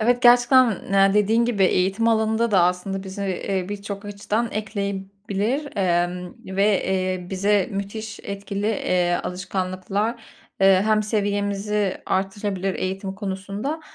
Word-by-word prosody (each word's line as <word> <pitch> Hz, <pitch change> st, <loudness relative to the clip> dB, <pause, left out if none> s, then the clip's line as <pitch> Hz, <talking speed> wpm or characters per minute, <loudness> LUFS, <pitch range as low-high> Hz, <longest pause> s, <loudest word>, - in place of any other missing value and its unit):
evet, 245 Hz, +3 st, +2 dB
gerçekten 240 Hz, -3 st, +5 dB
ne 195 Hz, 0 st, +5 dB
dediğin 215 Hz, +3 st, +3 dB
gibi 220 Hz, -5 st, +2 dB
eğitim 190 Hz, +5 st, +2 dB
alanında 220 Hz, +1 st, +2 dB
da 190 Hz, -4 st, +5 dB
aslında 180 Hz, +2 st, 0 dB
bize, 195 Hz, +1 st, -5 dB
eee, 190 Hz, 0 st, -2 dB
birçok 200 Hz, 0 st, -6 dB
açıdan 205 Hz, +3 st, -2 dB
ekleyebilir, 200 Hz, +5 st, -3 dB
emm 180 Hz, -1 st, 0 dB, 0.2 s
ve 195 Hz, -, +4 dB, 0.2 s
eee, 185 Hz, -1 st, -1 dB
bize 200 Hz, 0 st, +2 dB
müthiş 205 Hz, +2 st, -5 dB
etkili, 200 Hz, 0 st, -4 dB
eee, 180 Hz, -5 st, +1 dB
alışkanlıklar, 185 Hz, +4 st, -2 dB, 0.4 s
eee, 195 Hz, -1 st, +6 dB
hem 215 Hz, -1 st, +3 dB
seviyemizi 205 Hz, -1 st, -1 dB
arttırabilir 195 Hz, 0 st, -1 dB
eğitim 190 Hz, +1 st, -3 dB
konusunda 200 Hz, +9 st, -4 dB
200 Hz, 120 wpm, -23 LUFS, 190-215 Hz, 0.4 s, eee